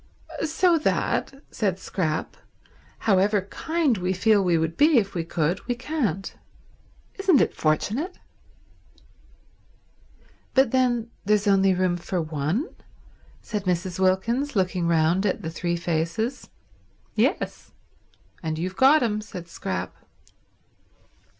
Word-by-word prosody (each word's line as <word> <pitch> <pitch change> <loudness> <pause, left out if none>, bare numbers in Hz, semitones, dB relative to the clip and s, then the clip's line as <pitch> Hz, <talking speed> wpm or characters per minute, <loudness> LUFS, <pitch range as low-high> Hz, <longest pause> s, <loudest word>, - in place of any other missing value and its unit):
"So 330 +2 +3
that," 275 -2 -1
said 195 -5 -1
Scrap, 160 -5 -3 0.7
"However 200 0 +3
kind 300 - -1
we 180 +1 0
feel 205 +2 +3
we 175 -2 +2
would 160 0 -1
be 300 0 +5
if 200 -4 +1
we 170 - -2
could, 165 +1 -1
we 245 - 0
can't. 240 - -2 0.9
Isn't 380 -8 +4
it - - +2
fortunate?" 220 - -1 2.4
"But 265 -3 +4
then 240 -3 +1
there's 210 +1 +2
only 195 -2 +4
room 180 -1 +1
for 175 +1 -3
one?" 155 - -1 0.8
said 210 -2 -4
Mrs. 180 0 -1
Wilkins, 230 +9 +1
looking 185 -3 0
round 170 +3 +2
at 190 - -2
the 160 - -4
three 170 +1 -2
faces. 170 +9 -2 0.6
"Yes—and 160 -2 -4
you've 185 +3 -4
got 275 +2 +6
him," 215 -2 0
said 180 -5 -9
Scrap. 90 - -4
195 Hz, 115 wpm, -25 LUFS, 170-245 Hz, 2.4 s, got